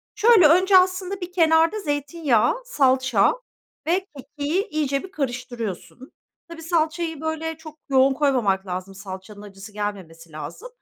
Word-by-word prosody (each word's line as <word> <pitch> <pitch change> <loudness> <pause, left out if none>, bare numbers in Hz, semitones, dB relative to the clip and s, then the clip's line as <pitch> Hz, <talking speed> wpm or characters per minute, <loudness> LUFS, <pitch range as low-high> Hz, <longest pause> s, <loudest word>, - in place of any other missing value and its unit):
Şöyle 435 -7 +6
önce 370 +4 +5
aslında 370 +1 +2
bir 355 0 -6
kenarda 330 +3 +3
zeytinyağı, 290 - 0
salça 260 - +2 0.5
ve 370 +3 0
kekiği 290 - -3
iyice 280 -3 -1
bir 380 - -10
karıştırıyorsun. 250 - -5 0.4
Tabii, 330 -1 -10
salçayı, 325 -1 -1
böyle, 320 0 -3
çok 310 -1 -13
yoğun 265 0 +4
koymamak 235 -10 +1
lazım. 185 +1 -5
Salçanın 200 +1 -10
acısı 200 +1 -12
gelmemesi 180 -6 -6
lazım. 155 - -8
290 Hz, 130 wpm, -23 LUFS, 210-335 Hz, 0.5 s, Şöyle